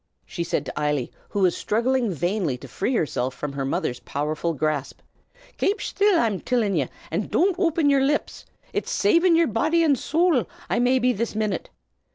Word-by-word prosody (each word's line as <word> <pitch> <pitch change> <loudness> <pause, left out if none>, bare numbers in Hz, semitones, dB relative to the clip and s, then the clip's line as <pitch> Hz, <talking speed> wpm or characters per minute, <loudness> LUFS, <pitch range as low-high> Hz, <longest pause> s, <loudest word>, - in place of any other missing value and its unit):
she 170 - -4
said 170 - -2
to - - -6
Eily, 150 -4 0 0.2
who 205 - -2
was 180 -2 +3
struggling 235 +1 0
vainly 175 -4 -1
to - - -11
free 245 +6 -2
herself 130 - -1
from 145 +1 -5
her 140 -1 -3
mother's 130 -2 -2
powerful 150 +3 -2
grasp. 150 -1 -2 0.6
"Kape 405 +3 +1
shtill, 405 -2 +2
I'm 220 - +1
tillin' 230 -6 0
ye, - - 0 0.2
an' - - -1
don't 370 +1 +2
open 330 -4 +2
yer 280 -1 +4
lips! 290 +2 -1 0.3
It's - - -2
savin' 355 -3 +3
yer 335 0 +4
body 315 +9 +1
an' 300 -4 +4
sowl 315 0 +1 0.2
I - - +2
may 250 +2 +3
be 250 0 +2
this 230 0 -3
minute. 215 -2 -2
225 Hz, 185 wpm, -24 LUFS, -, 0.6 s, yer